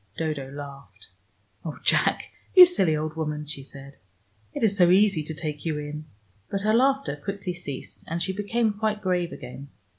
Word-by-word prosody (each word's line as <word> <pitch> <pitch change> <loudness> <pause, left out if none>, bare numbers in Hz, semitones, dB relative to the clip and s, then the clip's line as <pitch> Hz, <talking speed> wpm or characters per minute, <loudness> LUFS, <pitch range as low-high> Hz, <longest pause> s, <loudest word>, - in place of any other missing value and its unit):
Dodo 150 -4 -3
laughed. 140 -7 -10 0.5
"Oh, 160 -3 -5
Jack, - - +3 0.3
you 365 -1 +12
silly 190 - +2
old 155 0 -3
woman," 150 -1 -3
she 150 -1 -7
said. 140 0 -13 0.5
"It - - -4
is 205 -3 +3
so 175 -3 +5
easy 195 -2 +4
to 155 +1 -6
take 150 -2 -5
you 160 -3 -1
in." 150 +1 -6 0.4
But 195 - -2
her 215 +2 +2
laughter 270 - +2
quickly 195 -2 -4
ceased, 145 -7 -8
and 165 +1 -2
she 190 +2 -1
became 215 +3 0
quite 210 0 -2
grave 180 -2 0
again. 135 +3 -9
165 Hz, 175 wpm, -25 LUFS, 150-200 Hz, 0.5 s, you